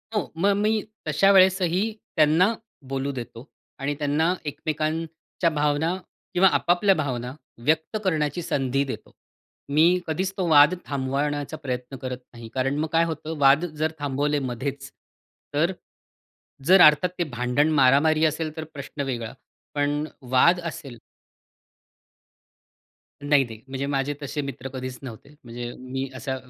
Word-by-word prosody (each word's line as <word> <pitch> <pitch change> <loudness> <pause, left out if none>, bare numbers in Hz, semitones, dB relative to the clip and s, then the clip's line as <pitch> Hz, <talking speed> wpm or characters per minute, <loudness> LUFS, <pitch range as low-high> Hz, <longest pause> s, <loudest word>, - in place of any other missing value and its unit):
हो, 210 - -1
मग 200 +4 +3
मी 215 +1 +1 0.3
तशा 195 0 +4
वेळेसही, 185 -1 +4 0.3
त्यांना 160 +7 +4 0.4
बोलू 135 +1 -2
देतो 120 +1 -9 0.3
आणि 140 +2 -1
त्यांना 150 +4 +1
एकमेकांच्या 160 +3 -2
भावना 150 +2 0 0.4
किंवा 185 +1 +5
आपापल्या 185 +3 +3
भावना, 125 -5 -3 0.3
व्यक्त 160 +7 +1
करण्याची 155 -3 0
संधी 135 -3 0
देतो. 135 - -7 0.6
मी 150 +3 +4 0.2
कधीच 185 +4 -1
तो 185 -2 0
वाद 150 +3 +7
थांबवण्याचा 145 +2 -2
प्रयत्न 130 -2 -5
करत 130 0 -5 0.2
नाही. 115 -1 -10
कारण 135 +2 0
मग 155 - 0
काय 165 +1 +4
होतं, 160 0 -5
वाद 140 +4 +5
जर 155 -1 -2
थांबवले 145 +1 0
मध्येच, 135 +3 -5 0.6
तर 160 +5 +2 0.9
जर 185 +3 +7
अर्थात 150 +3 +6
ते, - - +3
भांडण, 125 +1 0
मारामारी 155 +3 +4
असेल, 155 0 -1
तर 160 - -3
प्रश्न 140 +1 -6
वेगळा. 120 -4 -4 0.4
पण 145 +1 0 0.3
वाद 170 +8 +5
असेल 155 -7 -6 2.2
नाही 145 -1 +4
नाही 110 -2 -10
म्हणजे 135 +1 -3
माझे 140 0 -1
तसे 145 +1 -3
मित्र 135 -2 -6
कधीच 130 -1 -5
नव्हते. 120 0 -9
म्हणजे 120 0 -6
मी 130 +1 -4
असा 130 0 -3
145 Hz, 135 wpm, -25 LUFS, 135-160 Hz, 2.2 s, वाद